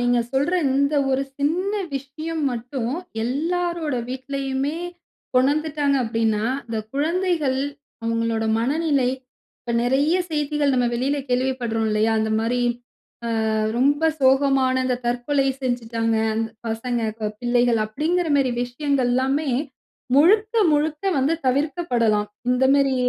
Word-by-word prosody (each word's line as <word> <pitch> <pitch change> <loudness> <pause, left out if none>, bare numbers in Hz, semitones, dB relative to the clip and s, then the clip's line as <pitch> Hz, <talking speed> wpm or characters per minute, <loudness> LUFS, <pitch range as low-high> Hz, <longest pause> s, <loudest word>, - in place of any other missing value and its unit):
நீங்க 245 0 +2
சொல்ற 280 +6 +1 0.2
இந்த 280 +2 +2 0.2
ஒரு 265 +1 +1 0.2
சின்ன 345 +8 0 0.2
விஷயம் 310 +4 -4
மட்டும், 245 0 -3 0.3
எல்லாரோட 330 +3 -1
வீட்லயுமே 270 +2 -3 0.6
உணர்ந்துட்டாங்க 285 +1 +1
அப்படீன்னா, 225 -2 0 0.2
இந்த 225 -1 -3 0.2
குழந்தைகள் 315 -3 0 0.5
அவுங்களோட 230 -1 0
மனநிலை 280 +1 +1 0.5
இப்ப 235 - -4
நெறைய 275 +7 +2
செய்திகள் 295 -2 0
நம்ம 245 -1 +2
வெளில 265 +4 0
கேள்விப்படுறோம், 245 -3 0
இல்லையா? 215 +1 +2
இந்த 220 0 -1
மாரி 245 +2 0 0.9
அ - - 0 0.3
ரொம்ப 285 +4 +2 0.2
சோகமான 265 -1 +3
இந்த, 250 -1 0
"தற்கொலை 245 +4 0 0.2
செஞ்சுட்டாங்க, 230 -2 -1 0.2
அந் 220 +1 0 0.2
பசங்க 230 +1 -2 0.2
ப 215 - 0
பிள்ளைகள்." 240 -1 +2
அப்படீங்கிற 320 +10 -1
மேரி 270 -2 +2
விஷயங்கள்லாமே, 265 +2 0 0.7
முழுக்க 420 - +4 0.2
முழுக்க 300 +2 0
வந்து 280 +5 +2
தவிர்க்கப்படலாம். 250 -7 +1 0.2
இந்த 250 +1 +2
மேரி 275 -1 +2
265 Hz, 110 wpm, -22 LUFS, 240-295 Hz, 0.9 s, முழுக்க